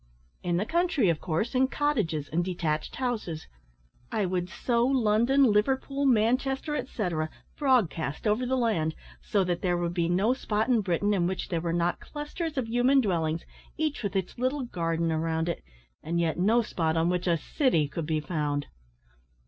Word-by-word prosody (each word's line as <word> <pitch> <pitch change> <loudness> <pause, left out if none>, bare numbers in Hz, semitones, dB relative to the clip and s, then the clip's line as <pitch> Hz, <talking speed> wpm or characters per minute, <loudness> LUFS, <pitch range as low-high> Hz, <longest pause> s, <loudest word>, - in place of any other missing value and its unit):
"In 175 -1 0
the 200 - 0
country, 330 - +2
of 165 -2 0
course, 185 +7 -1
in 260 0 +3
cottages 215 - 0
and 170 +3 0
detached 165 -4 -2
houses. 225 -11 -3 0.7
I 215 -3 +1
would 180 -1 -1
sow 235 +4 0
London, 250 +1 +3
Liverpool, 270 +6 +1
Manchester, 265 +5 +2
etcetera, 175 - -2 0.3
broadcast 215 - +1
over 215 +3 +2
the 260 +1 +1
land, 170 -10 +1 0.3
so 200 -2 +1
that 175 -1 -1
there 175 -2 +1
would 175 0 -1
be 170 -1 0
no 195 +7 +3
spot 220 -3 -1
in 235 -3 +4
Britain 205 +2 +1
in 175 -3 +2
which 185 0 -3
there 170 -3 -1
were 170 0 -1
not 175 +1 0
clusters 300 +1 -5
of 250 -4 0
human 245 +4 +4
dwellings, 165 -7 0 0.3
each 310 -2 -1
with 205 -2 -3
its 190 +4 -2
little 260 +2 0
garden 165 -6 -1
around 160 +1 0
it, 170 - -3 0.4
and 170 +2 -1
yet 165 0 0
no 225 +6 +4
spot 165 -6 -1
on 165 +1 +2
which 180 0 -1
a 170 -1 +3
city 165 - +1
could 150 +2 -5
be 160 -1 +1
found." 150 -3 -2
190 Hz, 175 wpm, -28 LUFS, 165-250 Hz, 0.7 s, in